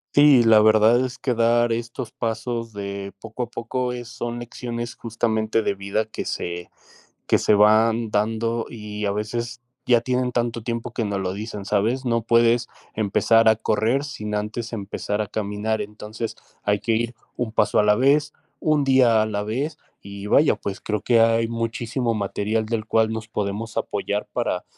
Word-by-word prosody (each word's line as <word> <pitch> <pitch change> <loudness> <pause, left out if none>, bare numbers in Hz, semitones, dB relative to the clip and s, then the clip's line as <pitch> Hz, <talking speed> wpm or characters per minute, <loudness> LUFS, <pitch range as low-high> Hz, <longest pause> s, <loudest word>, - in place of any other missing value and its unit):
Sí, 145 -3 +7
la 110 -1 +7
verdad 110 +3 +5
es 130 0 -7
que 125 -3 -1
dar 120 +1 +3
estos 115 +1 -4
pasos 115 0 -3
de 100 -1 -5
poco 115 +2 -5
a 120 - -5
poco 125 +2 -2
es 120 -1 -6
son 120 0 -5
lecciones, 120 0 -5
justamente, 110 -1 0
de 100 - -1
vida 100 +3 -2
que 110 - -6
se, 85 0 -4 0.6
que - - +4
se - - +2
van 110 +2 +4
dando, 115 +2 0
y 105 -2 -7
a 100 - +1
veces 120 +3 -4 0.2
ya 120 -2 +5
tienen 125 +1 -1
tanto 120 -1 -1
tiempo 115 0 -4
que 115 - -1
no 100 -2 -2
lo 95 -1 -2
dicen, 105 -1 -6
¿sabes? 110 +6 0
No 115 -1 +1
puedes 115 +1 +3 0.3
empezar 110 +2 +4
a 110 - +4
correr 110 +6 +1
sin 105 -7 -6
antes 105 +3 -3
empezar 105 -1 -3
a 105 - -3
caminar. 105 +1 -2
Entonces 105 +2 -6 0.3
hay 105 0 +1
que 115 - 0
ir 120 +1 -1 0.2
un 120 -3 -3
paso 105 -1 +2
a - - +5
la 105 0 +4
vez, 145 +4 +3 0.3
1 150 -3 +2
día 125 -5 +5
a - - +2
la 105 -1 -2
vez. 135 +9 -3 0.2
Y 100 0 -8
vaya, 145 +8 +4
pues, 100 - -5
creo 105 -2 -2
que 120 -2 +3
hay 115 0 +3
muchísimo 115 +1 -2
material 105 +1 -1
del 110 -1 -2
cual 110 0 +2
nos 110 0 -5
podemos 105 +1 -3
apoyar - - -2
para - - -1
115 Hz, 180 wpm, -23 LUFS, 105-120 Hz, 0.6 s, Sí